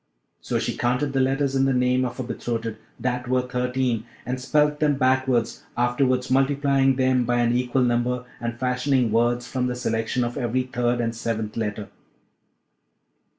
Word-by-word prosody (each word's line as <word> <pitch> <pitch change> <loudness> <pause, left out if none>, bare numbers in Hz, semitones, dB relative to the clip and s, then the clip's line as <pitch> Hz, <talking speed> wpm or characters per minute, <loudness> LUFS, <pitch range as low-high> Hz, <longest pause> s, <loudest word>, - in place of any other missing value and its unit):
So - - -1
she - - -2
counted 125 +4 0
the 135 - +1
letters 135 +1 +1
in 135 0 +3
the 135 -1 +2
name 125 +1 +2
of 125 -1 -5
her 130 - -3
betrothed, 115 -2 -3 0.2
that 125 0 -2
were 130 0 +2
thirteen, 125 -2 -1 0.2
and 125 +1 -3
spelt 150 +2 +2
them 150 -2 +2
backwards, 130 -2 +1
afterwards 125 +1 +1
multiplying 135 0 +3
them 130 -1 +2
by 120 +1 0
an 120 0 +2
equal 125 +1 +1
number, 120 +1 0
and 120 0 -4
fashioning 125 -1 +1
words 120 +2 +2
from 125 -1 -1
the 125 - -2
selection 115 0 -1
of 120 +3 -3
every 125 +1 0
third 120 -1 -1
and 115 -1 -2
seventh 110 -2 -3
letter. 105 -2 -3
125 Hz, 165 wpm, -24 LUFS, 120-130 Hz, 0.2 s, in